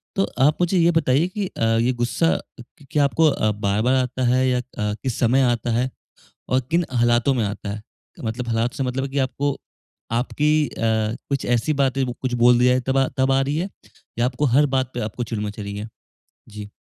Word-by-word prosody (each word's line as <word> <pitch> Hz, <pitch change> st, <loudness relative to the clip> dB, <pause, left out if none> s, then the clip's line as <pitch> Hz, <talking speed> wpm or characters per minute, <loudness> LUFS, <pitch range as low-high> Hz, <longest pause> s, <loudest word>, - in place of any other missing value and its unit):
तो 195 Hz, -, +2 dB, 0.2 s
आप 150 Hz, +2 st, +4 dB
मुझे 175 Hz, +2 st, +2 dB
ये 170 Hz, +1 st, +4 dB
बताइए 160 Hz, 0 st, +2 dB
कि 195 Hz, +1 st, -3 dB
अ, 115 Hz, -, -5 dB, 0.2 s
ये 125 Hz, +2 st, +2 dB
गुस्सा 165 Hz, +7 st, +1 dB, 0.2 s
क 120 Hz, +4 st, -16 dB
क्या 150 Hz, -1 st, +3 dB
आपको 160 Hz, +4 st, +2 dB
अ, 110 Hz, -6 st, 0 dB
बार-बार 105 Hz, +4 st, 0 dB
आता 130 Hz, 0 st, -1 dB
है 130 Hz, +1 st, +3 dB
या 125 Hz, -1 st, +1 dB
अ, -, -, -2 dB, 0.4 s
किस 130 Hz, -4 st, -2 dB
समय 125 Hz, +3 st, +3 dB
आता 120 Hz, 0 st, -2 dB
है 125 Hz, +3 st, +1 dB, 0.6 s
और 130 Hz, -, +3 dB
किन 170 Hz, 0 st, +2 dB
हालातों 120 Hz, +3 st, +3 dB
में 120 Hz, -3 st, 0 dB
आता 100 Hz, 0 st, -5 dB
है? 105 Hz, +1 st, -5 dB, 0.4 s
मतलब 120 Hz, +2 st, -3 dB
हालात 115 Hz, +1 st, 0 dB
से 135 Hz, -, -2 dB
मतलब 130 Hz, +1 st, -2 dB
है 135 Hz, -, -4 dB
कि 140 Hz, +1 st, -2 dB
आपको 140 Hz, +2 st, -1 dB, 0.5 s
आपकी 150 Hz, +5 st, +1 dB
अ, -, -, -12 dB, 0.6 s
कुछ 140 Hz, -1 st, -1 dB
ऐसी 120 Hz, +6 st, +1 dB
बातें 135 Hz, -1 st, +1 dB
बो 125 Hz, -, -4 dB
कुछ 130 Hz, -2 st, -2 dB
बोल 120 Hz, 0 st, +6 dB
दिया 125 Hz, +1 st, +4 dB
तब 135 Hz, +1 st, +1 dB
आ 135 Hz, -, +3 dB
तब 130 Hz, +1 st, +2 dB
आ 135 Hz, -, +3 dB
रही 140 Hz, +3 st, -1 dB
है 185 Hz, +4 st, -2 dB, 0.5 s
या 120 Hz, -, +3 dB
आपको 130 Hz, +3 st, -1 dB
हर 145 Hz, +1 st, +6 dB
बात 130 Hz, -1 st, 0 dB
पे 120 Hz, -, -4 dB
आपको 120 Hz, -, -5 dB
चिड़ 115 Hz, -2 st, -4 dB
मच 105 Hz, 0 st, -5 dB
रही 100 Hz, 0 st, -5 dB
है? 105 Hz, +2 st, -5 dB, 0.6 s
जी। 105 Hz, -1 st, -9 dB
130 Hz, 215 wpm, -22 LUFS, 120-140 Hz, 0.6 s, बोल